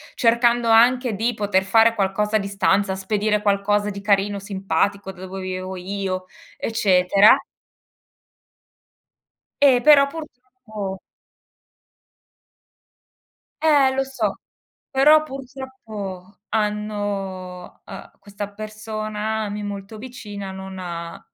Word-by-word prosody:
cercando 235 Hz, 0 st, +3 dB
anche 240 Hz, +1 st, +4 dB
di 230 Hz, +4 st, 0 dB
poter 205 Hz, -3 st, +1 dB
fare 225 Hz, +4 st, +4 dB
qualcosa 210 Hz, +2 st, 0 dB
a -, -, +4 dB
distanza, 195 Hz, -1 st, +1 dB
spedire 210 Hz, +2 st, 0 dB
qualcosa 205 Hz, 0 st, +1 dB
di 200 Hz, -1 st, -6 dB
carino, 200 Hz, 0 st, +1 dB
simpatico, 195 Hz, 0 st, -1 dB
da 185 Hz, -, -14 dB
dove 190 Hz, +1 st, -7 dB
vivevo 185 Hz, 0 st, -5 dB
io, 185 Hz, 0 st, -4 dB, 0.3 s
eccetera. 195 Hz, -2 st, +4 dB, 2.2 s
Eh, 260 Hz, -4 st, +6 dB
però 290 Hz, 0 st, +7 dB
purtroppo 245 Hz, -9 st, -8 dB, 2.6 s
Eh, 290 Hz, -4 st, +4 dB
lo 270 Hz, -, +1 dB
so! 270 Hz, 0 st, -3 dB, 0.5 s
Però 300 Hz, +3 st, +5 dB
purtroppo 245 Hz, -9 st, -8 dB
hanno 205 Hz, -4 st, -3 dB
uhm, 195 Hz, -, -10 dB
questa 205 Hz, 0 st, -7 dB
persona 215 Hz, 0 st, -4 dB
a -, -, -4 dB
me 205 Hz, +1 st, -5 dB
molto 200 Hz, +1 st, -7 dB
vicina 210 Hz, -5 st, -8 dB
non 190 Hz, 0 st, -8 dB
ha 170 Hz, -2 st, -6 dB
205 Hz, 100 wpm, -22 LUFS, 195-230 Hz, 2.6 s, però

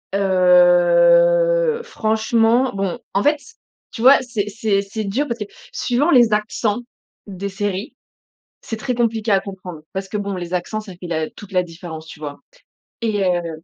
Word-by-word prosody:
heu, 465 Hz, -, +4 dB
franchement, 225 Hz, -, +1 dB
bon. 195 Hz, -2 st, -3 dB
En 200 Hz, -, +1 dB
fait 295 Hz, 0 st, +3 dB
c 455 Hz, -, -17 dB, 0.4 s
tu 225 Hz, -, -7 dB
vois, 265 Hz, +3 st, +8 dB
c'est 220 Hz, -5 st, -3 dB
c'est 205 Hz, -2 st, 0 dB
c'est 210 Hz, +2 st, -5 dB
dur 250 Hz, +9 st, -1 dB
parce 235 Hz, -1 st, -4 dB
que 210 Hz, -, -3 dB, 0.3 s
suivant 265 Hz, +7 st, 0 dB
les 240 Hz, -4 st, +5 dB
accents 210 Hz, +1 st, -1 dB, 0.5 s
des 200 Hz, 0 st, -5 dB
séries, 200 Hz, +2 st, -4 dB, 0.7 s
c'est 225 Hz, -, -6 dB
très 250 Hz, +2 st, -3 dB
compliqué 225 Hz, -2 st, 0 dB
à 195 Hz, -, +4 dB
comprendre. 185 Hz, -5 st, -9 dB
Parce 190 Hz, 0 st, -5 dB
que 210 Hz, -, -3 dB
bon 200 Hz, -1 st, -3 dB
les 175 Hz, 0 st, -6 dB
accents 215 Hz, +5 st, -2 dB
ça 205 Hz, -3 st, -10 dB
fait 175 Hz, 0 st, -10 dB
la 160 Hz, -2 st, -2 dB
toute 205 Hz, -1 st, -13 dB
la 180 Hz, -1 st, +2 dB
différence, 165 Hz, -2 st, -9 dB
tu 155 Hz, -, -12 dB
vois? 145 Hz, -1 st, -7 dB, 0.6 s
Et, 210 Hz, -3 st, 0 dB
heu, 170 Hz, -3 st, -2 dB
205 Hz, 170 wpm, -20 LUFS, 185-240 Hz, 0.7 s, vois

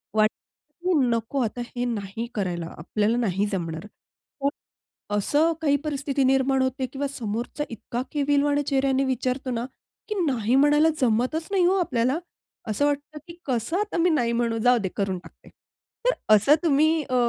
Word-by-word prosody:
वाटतं, 215 Hz, +7 st, -1 dB
की 365 Hz, 0 st, +1 dB
"नको 230 Hz, +4 st, -1 dB
आता 235 Hz, +2 st, -3 dB
हे 245 Hz, 0 st, -3 dB
नाही 220 Hz, -1 st, -3 dB
करायला. 175 Hz, -4 st, -2 dB
आपल्याला 210 Hz, +8 st, 0 dB
नाही 205 Hz, -4 st, +1 dB
जमणार." 165 Hz, 0 st, -4 dB, 1.2 s
असं 295 Hz, +11 st, +2 dB
काही 285 Hz, -2 st, +3 dB
परिस्थिती 280 Hz, -2 st, -1 dB
निर्माण 265 Hz, 0 st, +3 dB
होते 260 Hz, 0 st, 0 dB
किंवा 280 Hz, +1 st, -2 dB
समोरचा 240 Hz, +2 st, -4 dB
इतका 235 Hz, +2 st, -5 dB
केविलवाणी 290 Hz, 0 st, +2 dB
चेहऱ्याने 270 Hz, -1 st, +1 dB
विचारतो 260 Hz, 0 st, -1 dB
ना, 235 Hz, 0 st, -2 dB, 0.4 s
की 425 Hz, -, -1 dB
नाही 245 Hz, -4 st, +1 dB
म्हणायला 295 Hz, +3 st, +5 dB
जमतच 255 Hz, +7 st, +1 dB
नाही 380 Hz, -3 st, +3 dB
हो 370 Hz, -, +4 dB
आपल्याला. 255 Hz, -2 st, +1 dB, 0.5 s
असं 220 Hz, +7 st, +1 dB
वाटतं 290 Hz, +1 st, -2 dB
की 335 Hz, 0 st, -11 dB
"कसं 255 Hz, +6 st, -1 dB
आता 420 Hz, -3 st, -2 dB
मी 345 Hz, +2 st, +3 dB
नाही 245 Hz, -8 st, +2 dB
म्हणू. 235 Hz, -1 st, 0 dB
जाऊदे 245 Hz, -6 st, +3 dB
करून 195 Hz, -2 st, 0 dB
टाकते." 175 Hz, -, -17 dB, 0.6 s
तर -, -, +5 dB, 0.2 s
असं 215 Hz, +8 st, +5 dB
तुम्ही 315 Hz, +1 st, +3 dB
अ, 255 Hz, -, -3 dB
260 Hz, 155 wpm, -25 LUFS, 225-290 Hz, 1.2 s, म्हणायला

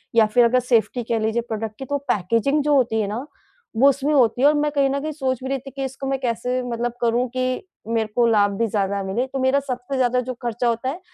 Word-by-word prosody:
या 225 Hz, -1 st, +6 dB
फिर 240 Hz, +3 st, +3 dB
अगर 250 Hz, +2 st, +3 dB
सेफ़्टी 245 Hz, 0 st, +1 dB
कह 230 Hz, 0 st, -1 dB
लीजिए 220 Hz, +2 st, 0 dB
प्रोडक्ट 220 Hz, -1 st, -4 dB
की 265 Hz, -, -5 dB
तो 285 Hz, +2 st, -1 dB
पैकेजिंग 230 Hz, +9 st, +1 dB
जो 295 Hz, 0 st, +2 dB
होती 230 Hz, -4 st, +2 dB
है 205 Hz, -, -1 dB
ना 225 Hz, +6 st, -4 dB, 0.5 s
वो 275 Hz, +4 st, +6 dB
उसमें 280 Hz, +2 st, 0 dB
होती 245 Hz, -3 st, +3 dB
है 280 Hz, -, +6 dB
और 295 Hz, -, +5 dB
मैं 295 Hz, 0 st, +1 dB
कहीं 280 Hz, -2 st, +2 dB
न 275 Hz, +1 st, -1 dB
कहीं 310 Hz, +1 st, -3 dB
सोच 265 Hz, -4 st, -2 dB
भी 260 Hz, -, -4 dB
रही 270 Hz, 0 st, -1 dB
थी 275 Hz, +2 st, -11 dB
कि 275 Hz, 0 st, -5 dB
इसको 265 Hz, +1 st, -6 dB
मैं 270 Hz, 0 st, -1 dB
कैसे 250 Hz, 0 st, -1 dB
मतलब 240 Hz, 0 st, -3 dB
करूँ 240 Hz, +1 st, +1 dB
कि, 255 Hz, +7 st, -2 dB, 0.2 s
मेरे 225 Hz, -1 st, 0 dB
को 240 Hz, -, +4 dB
लाभ 205 Hz, -3 st, +3 dB
भी 230 Hz, -, +1 dB
ज़्यादा 200 Hz, -1 st, -1 dB
मिले 195 Hz, +7 st, -1 dB
तो 270 Hz, -, -2 dB
मेरा 260 Hz, +2 st, +3 dB
सबसे 255 Hz, -1 st, -5 dB
ज़्यादा 250 Hz, -1 st, +2 dB
जो 255 Hz, +1 st, -5 dB
खर्चा 240 Hz, 0 st, -1 dB
होता 235 Hz, +2 st, 0 dB
है, 310 Hz, +7 st, -5 dB
250 Hz, 260 wpm, -22 LUFS, 230-270 Hz, 0.5 s, या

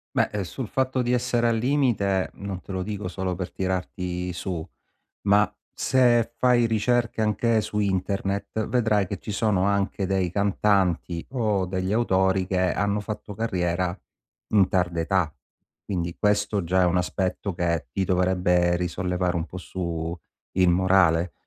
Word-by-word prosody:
Beh, 105 Hz, -2 st, +1 dB
sul 120 Hz, +7 st, -5 dB
fatto 130 Hz, +2 st, 0 dB
di 120 Hz, +1 st, 0 dB
essere 120 Hz, -1 st, +1 dB
al 115 Hz, -, +2 dB
limite, 115 Hz, -7 st, +1 dB
non 100 Hz, -2 st, -6 dB
te 95 Hz, -, -9 dB
lo 95 Hz, -1 st, -2 dB
dico 105 Hz, 0 st, -4 dB
solo 90 Hz, 0 st, -3 dB
per 90 Hz, -1 st, -5 dB
tirarti 90 Hz, -1 st, -3 dB
su, 90 Hz, -2 st, -4 dB, 0.6 s
ma 100 Hz, +1 st, +4 dB, 0.2 s
se 120 Hz, -3 st, +3 dB
fai 120 Hz, -2 st, +4 dB
ricerche 115 Hz, 0 st, +1 dB
anche 110 Hz, +1 st, +2 dB
su 105 Hz, -, -3 dB
internet 100 Hz, +2 st, -1 dB
vedrai 110 Hz, -5 st, +2 dB
che 100 Hz, -, -4 dB
ci 105 Hz, -, -7 dB
sono 105 Hz, -3 st, +1 dB
anche 100 Hz, 0 st, 0 dB
dei 95 Hz, -1 st, 0 dB
cantanti 95 Hz, -3 st, +1 dB
o 105 Hz, -7 st, 0 dB
degli 95 Hz, +1 st, -2 dB
autori 95 Hz, -4 st, +2 dB
che 90 Hz, -2 st, +1 dB
hanno 100 Hz, +1 st, 0 dB
fatto 105 Hz, 0 st, -6 dB
carriera 90 Hz, -4 st, -1 dB, 0.5 s
in 100 Hz, -3 st, +4 dB
tarda 90 Hz, -2 st, 0 dB
età. 85 Hz, -2 st, 0 dB, 0.5 s
Quindi 85 Hz, -3 st, -3 dB
questo 105 Hz, -1 st, +1 dB
già 90 Hz, +2 st, +2 dB
è -, -, +5 dB
un 90 Hz, 0 st, +2 dB
aspetto 90 Hz, +1 st, -2 dB
che 85 Hz, -5 st, -1 dB
ti 95 Hz, -, 0 dB
dovrebbe 90 Hz, -1 st, +2 dB
risollevare 90 Hz, 0 st, -1 dB
un 85 Hz, 0 st, -1 dB
po' 90 Hz, -, -9 dB
su 85 Hz, -2 st, -4 dB, 0.4 s
il 90 Hz, -1 st, +3 dB
morale, 90 Hz, -2 st, +3 dB
95 Hz, 150 wpm, -25 LUFS, 90-105 Hz, 0.6 s, è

